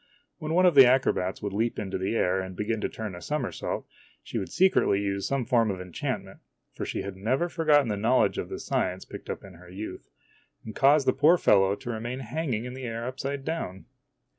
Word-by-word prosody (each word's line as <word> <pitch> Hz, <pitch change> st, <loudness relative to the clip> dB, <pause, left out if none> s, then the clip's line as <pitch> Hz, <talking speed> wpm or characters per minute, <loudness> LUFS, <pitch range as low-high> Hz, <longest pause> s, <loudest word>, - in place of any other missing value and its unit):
When 155 Hz, +1 st, -2 dB
one 185 Hz, +1 st, +5 dB
of 180 Hz, -, +6 dB
the 135 Hz, -3 st, +9 dB
acrobats 115 Hz, -8 st, +1 dB
would 100 Hz, -1 st, -3 dB
leap 115 Hz, +3 st, 0 dB
into 95 Hz, -2 st, -3 dB
the 95 Hz, +4 st, -1 dB
air 95 Hz, -3 st, +2 dB
and 95 Hz, -1 st, -7 dB
begin 105 Hz, +3 st, -2 dB
to -, -, -1 dB
turn 110 Hz, -3 st, -6 dB
a 90 Hz, -, -9 dB
somersault, 150 Hz, -4 st, -3 dB, 0.4 s
she -, -, -4 dB
\vould 95 Hz, -, -5 dB
secretly 185 Hz, -, +3 dB
use 100 Hz, -1 st, -2 dB
some 135 Hz, -3 st, -1 dB
form 115 Hz, -2 st, +3 dB
of 95 Hz, -2 st, -3 dB
enchantment 90 Hz, -2 st, -5 dB, 0.3 s
for -, -, -5 dB
she -, -, -3 dB
had 100 Hz, -1 st, -6 dB
never 125 Hz, -, 0 dB
forgotten 155 Hz, -5 st, +3 dB
the 105 Hz, -2 st, -1 dB
knowledge 115 Hz, +5 st, +2 dB
of -, -, -4 dB
the -, -, -5 dB
science 90 Hz, +1 st, -2 dB
picked -, -, -10 dB
up -, -, -4 dB
in 95 Hz, -1 st, -12 dB
her 90 Hz, +1 st, -15 dB
youth 100 Hz, +4 st, -8 dB, 0.6 s
and 110 Hz, -, -7 dB
cause 140 Hz, +1 st, +5 dB
the 130 Hz, -, +3 dB
poor 165 Hz, +4 st, +5 dB
fellow 100 Hz, -, +4 dB
to 120 Hz, -, -6 dB
remain 120 Hz, +3 st, -4 dB
hanging 125 Hz, -2 st, -2 dB
in 125 Hz, -, -6 dB
the 130 Hz, 0 st, -7 dB
air 115 Hz, 0 st, -4 dB
upside 135 Hz, +2 st, -4 dB
down. 125 Hz, -, -4 dB
115 Hz, 215 wpm, -27 LUFS, 100-135 Hz, 0.6 s, the